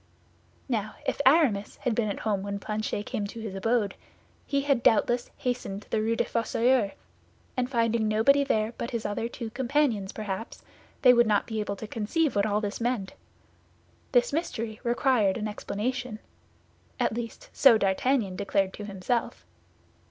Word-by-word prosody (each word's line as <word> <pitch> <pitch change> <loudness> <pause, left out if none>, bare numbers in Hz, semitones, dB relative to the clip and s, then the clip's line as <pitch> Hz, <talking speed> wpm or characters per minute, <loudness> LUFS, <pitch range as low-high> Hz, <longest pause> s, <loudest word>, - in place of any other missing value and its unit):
Now, 215 -5 -2
if - - -1
Aramis 265 -9 +3
had 250 - -1
been 215 -1 0
at 200 - -4
home 205 -3 0
when 200 0 -3
Planchet 210 0 -3
came 215 -5 -3
to 230 - -8
his 220 -3 -5
abode, 205 +1 +1 0.5
he 280 -1 +1
had 275 -3 +1
doubtless 240 +2 +3
hastened 225 -6 -3
to - - -26
the 215 - +1
Rue 225 +1 +1
des - - +2
Fossoyeurs, 230 -1 +1 0.6
and 250 0 0
finding 230 -3 +1
nobody 225 +7 +4
there 220 -4 0
but 235 - -3
his 235 -2 -4
other 205 +3 -2
two 230 -2 -6
companions 240 -5 0
perhaps, 210 +1 -5 0.4
they 250 -2 +9
would 240 -1 +5
not 210 -1 +2
be 220 -2 -3
able 205 -1 -2
to 220 - -7
conceive 230 +8 0
what 200 +1 +2
all 210 0 +1
this 205 +2 -4
meant. 230 -5 -1 1.0
This - - +3
mystery 230 -9 -3
required 240 -5 +2
an 215 -1 -2
explanation; 220 +3 -3 0.8
at - - +1
least, 230 -1 -6
so 260 -5 +7
D'Artagnan 200 +1 +1
declared 195 0 0
to 210 - -7
himself. 200 +4 -2
225 Hz, 165 wpm, -27 LUFS, 205-245 Hz, 1.0 s, they